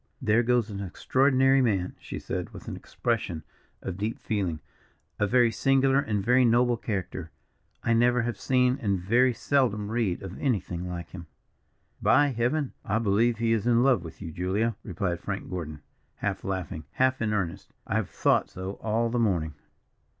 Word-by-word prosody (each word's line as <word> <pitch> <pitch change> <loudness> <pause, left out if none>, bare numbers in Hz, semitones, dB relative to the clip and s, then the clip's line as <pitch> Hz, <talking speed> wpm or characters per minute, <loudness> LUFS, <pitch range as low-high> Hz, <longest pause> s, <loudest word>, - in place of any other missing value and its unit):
"There 115 -3 +3
goes 120 -2 +1
an 100 - -5
extraordinary 135 +7 +3
man," 100 -7 0
she - - -7
said, - - -5
with - - -11
an - - -4
expression 80 -3 -3 0.4
of 95 0 -5
deep 110 +3 -2
feeling. 95 -8 -2 0.6
"A 105 - +2
very 120 +1 +4
singular, 135 +2 +3
and 105 -7 -1
very 125 +1 +5
noble 120 +1 +4
character. 95 -6 -4 0.5
I 115 - +2
never 120 +1 +3
have 120 -3 -3
seen 125 0 +2
and 100 -4 0
very 120 +8 +3
seldom 115 -4 0
read 110 -7 -1
of 95 0 -7
anything 90 - -1
like 85 -2 -6
him." 85 -3 -9 0.7
"By 145 0 +4
Heaven! 125 +4 -1
I 100 - 0
believe 115 +2 +2
he 115 0 +1
is 115 0 0
in 120 0 +4
love 130 -10 +3
with 85 +3 -10
you, 80 - -6
Julia," 95 +7 -1
replied 90 -2 -2
Frank - - -5
Gordon, 75 -4 -5 0.3
half 100 -2 -3
laughing, 90 -5 -4
half 130 -1 +2
in 110 -2 0
earnest. 95 -6 -3
"I - - -4
have - - -2
thought - - +2
so 95 +2 -6
all 115 +1 0
the 120 - 0
morning." 85 -9 +1
110 Hz, 170 wpm, -27 LUFS, 95-125 Hz, 0.7 s, very